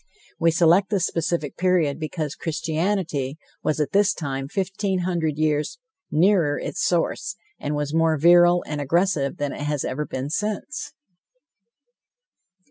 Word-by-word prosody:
We 165 - +4
select 170 +4 +4
this 195 -4 +1
specific 165 -3 -2
period, 170 -5 +2
because 155 -2 -3
Christianity 160 -3 -2 0.2
was 155 - 0
at 150 -2 0
this 200 0 +3
time 135 -3 -4
fifteen 195 +2 -1
hundred 170 -4 -1
years 155 - 0 0.3
nearer 170 -3 +3
to - - -6
its - - -3
source, - - 0 0.2
and 150 +1 -2
was 145 0 -2
more 165 -1 +3
virile 175 +2 +6
and 150 -1 -4
aggressive 155 -1 +1
than 145 -1 -2
it - - -7
has 145 -1 -1
ever 150 +3 -3
been 130 +3 -4
since. 210 - -3
160 Hz, 140 wpm, -23 LUFS, 145-180 Hz, 0.3 s, virile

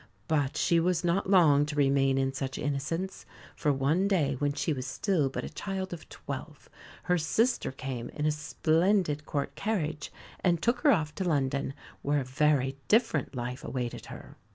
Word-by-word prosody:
But 145 -3 0
she 170 - +3
was 175 0 +1
not 175 +3 +1
long 155 -7 +6
to 150 - -4
remain 135 -1 +3
in 135 0 +1
such 135 -1 -4
innocence; 165 +6 -3 0.3
for 150 - +1
one 145 +8 +2
day 160 -8 +2
when 145 -1 +1
she 155 +2 -1
was 130 -2 -4
still 155 -1 0
but - - -4
a - - -5
child 190 -2 -4
of 160 -3 -9
twelve - - -8 0.4
her 180 -1 +2
sister 225 - +1
came 130 -3 -5
in 150 - -3
a 155 - +3
splendid 155 +1 +1
Court 140 -2 -2
carriage, 160 -9 -2 0.3
and 175 -2 +3
took 235 +7 +1
her 285 +3 +5
off 155 - +1
to 190 - -3
London, 140 -4 0 0.3
where 145 0 +1
a - - -3
very 135 0 +1
different 160 - +2
life 125 +1 -4
awaited 125 -2 -4
her. - - -11
150 Hz, 175 wpm, -29 LUFS, 135-180 Hz, 0.4 s, long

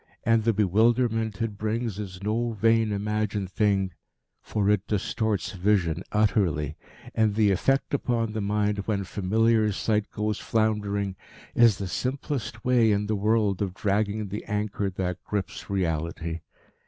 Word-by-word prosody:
And 115 -1 +3
the 115 - +5
bewilderment 110 +2 +2
it 105 -3 -4
brings 110 -1 -2
is 95 -2 -7
no 115 +3 0
vain, 115 +1 +3
imagined 105 -1 -1
thing, 100 -2 +1 0.5
for 100 -2 -1
it 105 -1 0
distorts 105 -2 -1
vision 90 -4 +1
utterly, 95 -9 +1 0.4
and 110 -2 +2
the 105 -2 +4
effect 135 +10 +1
upon 115 -5 0
the 110 - -2
mind 105 0 0
when 100 -3 0
familiar 110 +3 +2
sight 105 +1 0
goes 105 0 -2
floundering 105 -3 0 0.4
is 115 -4 +5
the 100 - -4
simplest 130 - -3
way 120 -3 +4
in 105 0 +1
the 110 +1 0
world 105 -1 +1
of 95 -2 -2
dragging 105 +1 0
the 105 +3 -5
anchor 105 -1 -1
that 90 -1 -3
grips 100 -2 -4
reality. 85 -3 -2
105 Hz, 140 wpm, -26 LUFS, 100-110 Hz, 0.5 s, the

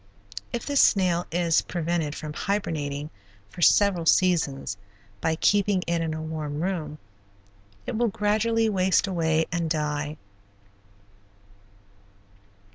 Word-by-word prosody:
If 240 - -4
this 285 -1 +3
snail 180 -3 +3
is 170 -1 +2
prevented 165 -3 -2
from 155 -2 -6
hibernating 150 -7 -3 0.4
for - - -9
several 180 -1 +4
seasons 160 - +2 0.5
by 160 - +1
keeping 200 +1 +2
it 170 -1 0
in 160 -1 -2
a 155 - -5
warm 155 -2 -4
room, 160 -5 -3 0.9
it - - -4
will 240 +2 +2
gradually 220 +2 +1
waste 190 -3 +2
away 165 -4 +1
and 170 -1 -1
die. 150 -1 -2
170 Hz, 115 wpm, -25 LUFS, 155-195 Hz, 0.9 s, several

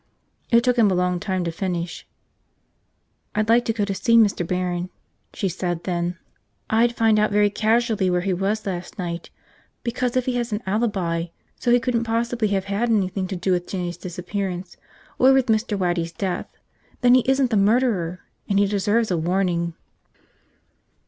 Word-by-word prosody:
It 235 -1 +4
took 250 -1 +2
him 220 -3 +5
a 185 - +1
long 180 0 +1
time 185 -1 -2
to 170 - -2
finish. 175 -1 -4 1.3
"I'd 215 +1 0
like 240 +1 +4
to - - +1
go 210 -2 0
to 200 - -2
see 230 +4 +3
Mr. 210 -5 +4
Barron," 180 0 -2 0.4
she 195 - -2
said 175 -1 -3
then. 175 -1 -2 0.5
"I'd 235 +2 +3
find 220 -1 +3
out 210 - +3
very 205 0 +3
casually 220 -2 +1
where 180 0 +1
he 190 +1 0
was 200 +4 -1
last 180 0 -5
night, 170 -3 -5 0.5
because 245 +1 -1
if 255 - +1
he 255 - 0
has 240 -1 -2
an 210 +2 -3
alibi 190 -5 -1 0.3
so 245 - +1
he 245 - +6
couldn't 235 -1 -1
possibly 230 0 0
have 195 -2 -1
had 205 +4 -1
anything 195 -3 0
to 190 - -4
do 180 +2 -1
with 175 -1 0
Jinny's 175 -2 -3
disappearance, 180 +1 -5 0.4
or 260 +1 +6
with 265 -2 +3
Mr. 220 -2 0
Waddy's 175 -3 -1
death, 185 0 -3 0.5
then 245 -1 +5
he 255 - +6
isn't 265 -2 +2
the - - +2
murderer. 200 -5 +1 0.3
And 200 - +2
he 200 - +4
deserves 205 +2 +1
a 175 - +1
warning." 170 0 0
200 Hz, 175 wpm, -23 LUFS, 180-230 Hz, 1.3 s, he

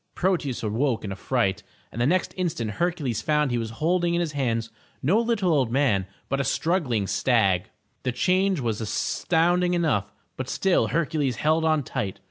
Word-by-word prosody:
Proteus 170 -10 0
awoke 115 +3 0
in 100 - -4
a - - -4
fright, 105 -2 0 0.3
and 120 - -4
the 120 - +3
next 185 +4 +1
instant 155 - -2
Hercules 155 - -1
found 150 -3 +1
he 120 - 0
was 115 -1 -3
holding 170 +8 0
in - - +1
his 170 -3 -1
hands 115 -5 -1 0.3
no 180 +11 +3
little 225 -7 +1
old 130 -6 +1
man, 120 -8 +2 0.2
but 140 +1 0
a - - 0
struggling 135 - 0
stag. 100 -5 +2 0.3
The 125 - -1
change 185 +7 +2
was 115 -4 -2
astounding 175 - +1
enough 125 - 0 0.3
but 130 0 -4
still 190 -2 +2
Hercules 150 -5 0
held 155 +6 +1
on 155 -2 +2
tight. 100 -5 -3
140 Hz, 175 wpm, -25 LUFS, 115-170 Hz, 0.3 s, the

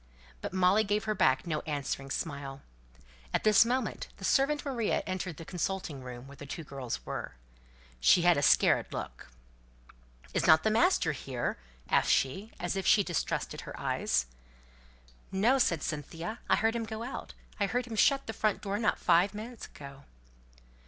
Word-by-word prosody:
But - - -4
Molly 185 +3 +4
gave 205 0 0
her 215 -1 0
back 135 -9 +2
no 155 -3 -1
answering 140 -2 -3
smile. 140 -2 -4 0.7
At - - 0
this 215 -1 +7
moment, 245 0 -2
the 190 - -6
servant 290 +6 +2
Maria 240 -6 0
entered 185 -4 -4
the 165 - -9
consulting 180 -5 -3
room, 125 -1 -8
where 140 +1 -12
the 145 - -9
two 160 +4 -6
girls 135 -5 -5
were. - - -5 0.6
She 115 - +5
had 175 -1 +6
a 145 - 0
scared - - +4
look. - - -6 1.1
"Isn't 160 +4 +5
master 230 - +3
here?" 130 -3 -3 0.3
asked - - +2
she, 190 - +1
as 175 +1 -2
if 195 - -2
she 205 - +6
distrusted 175 -3 -2
her - - -9
eyes. 65 - 0 1.1
"No!" 230 +8 +3
said 170 - +2
Cynthia. 165 - -5
"I - - +6
heard 225 +1 +1
him 230 -1 -2
go 220 +1 -5
out. 250 - -7 0.2
I 200 - +2
heard 245 +3 -1
him 230 -2 -6
shut 275 +6 +3
the 225 - -5
front 215 0 0
door 200 0 -2
not 220 - +1
five 185 +5 +3
minutes 225 +2 -7
ago." 140 -1 -12
185 Hz, 165 wpm, -30 LUFS, 145-220 Hz, 1.1 s, this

